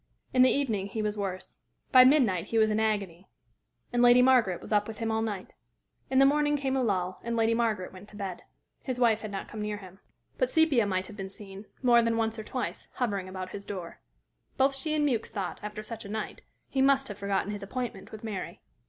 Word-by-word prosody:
In 255 - +5
the 255 - +7
evening 220 -9 0
he 215 +2 -3
was 210 0 -1
worse. 190 -3 -5 0.3
By 255 -2 +9
midnight 245 - +4
he 230 - -2
was 220 -1 +4
in 210 - +1
agony, 200 -5 -1 0.7
and 240 - +2
Lady 245 +1 +7
Margaret 245 -9 +4
was - - -6
up 210 0 +3
with 220 -1 -7
him 225 -1 -2
all 220 0 0
night. 205 -4 -4 0.6
In 265 - +1
the 270 - +7
morning 295 +1 +3
came 270 -1 -1
a 265 - +1
lull, 185 -5 -1
and 235 0 -2
Lady 225 0 +3
Margaret 220 -6 -1
went 190 +2 -12
to - - -15
bed. 195 -3 -5 0.4
His 255 -3 -3
wife 225 -3 +3
had 215 - -5
not 195 -1 -5
come 215 - -7
near 210 0 -2
him. 190 -1 -13 0.4
But - - +2
Sepia 305 - +3
might 185 -1 -1
have 210 +2 -10
been 195 -1 -5
seen, 195 0 -11 0.2
more 240 -1 +6
than 230 0 +1
once 225 0 -1
or - - -5
twice, 250 +4 -4
hovering 200 -7 -2
about 185 0 -6
his 200 - -7
door. 185 -5 -7 0.6
Both 270 +1 +3
she 305 +3 -2
and 300 -1 +2
Mewks 235 -5 -1
thought, 200 -4 -4
after 210 0 -6
such 230 +1 -7
a 200 - -9
night, 215 +1 -4 0.3
he 265 - 0
must 270 0 +4
have 205 - -7
forgotten 200 0 -1
his 205 -1 -5
appointment 245 +5 -5
with 220 0 -9
Mary. 210 -4 -5
220 Hz, 230 wpm, -29 LUFS, 200-250 Hz, 0.7 s, By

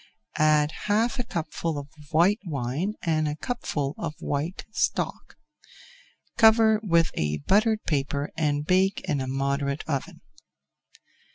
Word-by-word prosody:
Add 155 -1 +4
half 225 +5 +1
a - - 0
cupful 165 -5 -3
of 140 -1 -6 0.2
white 175 +8 +3
wine 150 - -2
and 155 -2 +1
a 150 - -2
cupful 150 - -3
of 160 -2 -4
white 150 +6 -3
stock. - - -2 1.0
Cover 220 -1 +6
with 170 -6 +2
a 75 0 -1
buttered 215 +1 +3
paper 140 -1 -1
and 150 -2 0
bake 190 +3 +2
in 145 -5 0
a 130 - -3
moderate 140 +1 -1
oven. 140 -4 -3
155 Hz, 125 wpm, -26 LUFS, 145-200 Hz, 1.0 s, Cover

